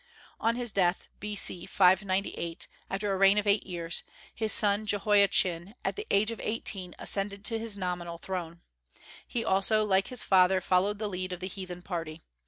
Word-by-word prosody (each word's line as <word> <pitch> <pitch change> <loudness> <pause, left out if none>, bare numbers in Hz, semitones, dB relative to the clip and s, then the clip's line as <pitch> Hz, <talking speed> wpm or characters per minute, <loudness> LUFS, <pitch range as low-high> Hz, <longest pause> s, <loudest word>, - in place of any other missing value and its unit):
On 230 +1 +1
his 240 -2 -3
death, 185 -2 0
B.C. 205 -4 +1
598, 190 -2 +1 0.2
after 195 +1 -2
a - - -1
reign 195 +1 +5
of 210 - +1
eight 205 0 +2
years, 170 -2 -3 0.3
his 220 -1 0
son 205 0 +3
Jehoiachin, 200 -2 +2
at - - -1
the 420 +1 -6
age 215 +3 +2
of 230 - -7
eighteen, 195 -4 -3
ascended 200 0 0
his 225 -2 -1
nominal 175 -2 -4
throne. 170 -1 -6 0.7
He 235 -2 -3
also, 215 +3 +3
like 195 -1 +2
his 245 -4 +1
father, 185 0 +4
followed 190 +3 +1
the 215 0 -3
lead 185 -1 -4
of 180 - -6
the 185 - -5
heathen 180 -2 -7
party. 165 -3 -5
195 Hz, 170 wpm, -29 LUFS, 180-210 Hz, 0.7 s, reign